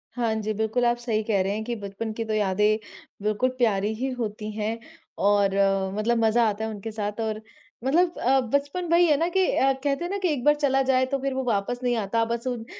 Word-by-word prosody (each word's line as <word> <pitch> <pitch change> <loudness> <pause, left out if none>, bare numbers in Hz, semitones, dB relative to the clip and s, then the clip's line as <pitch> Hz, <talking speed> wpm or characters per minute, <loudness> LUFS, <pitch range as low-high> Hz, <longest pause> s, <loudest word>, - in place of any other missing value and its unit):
हाँ 235 -2 0
जी, 215 +1 -2
बिल्कुल 220 +3 0
आप 240 0 +2
सही 235 -3 -1
कह 210 -3 +1
रहे 195 +1 -1
हैं 220 - -3
कि 240 - -3
बचपन 205 +1 -5
की 225 +1 -3
तो 220 - -2
यादें 210 +1 +2 0.5
बिल्कुल 215 +4 +1
प्यारी 215 -3 +1
ही 265 +1 -1
होती 215 -2 -4
हैं 220 +1 -2 0.5
और 205 -1 +3 0.5
मतलब 230 +2 +1
मज़ा 225 +1 +4
आता 210 +1 -4
है 220 - -2
उनके 215 +1 -6
साथ 210 0 -4
और 215 -1 -2 0.4
मतलब 335 +6 +2
अ, 265 +2 +3
बचपन 280 +8 -1
वही 345 +1 +6
है 300 - +4
ना 335 - +1
कि 375 +1 +2
अ, 270 +1 +3
कहते 275 +4 -2
हैं 350 - -3
ना 400 - -1
कि 380 - 0
एक 255 -4 -4
बार 295 +2 +5
चला 270 -2 +2
जाए 260 -1 +4
तो 275 +1 -2
फिर 270 0 -2
वो 265 0 -2
वापस 235 0 -1
नहीं 245 -1 +1
आता। 225 +2 0
बस 235 +2 -3
उन 240 -3 -3
230 Hz, 235 wpm, -25 LUFS, 215-265 Hz, 0.5 s, वही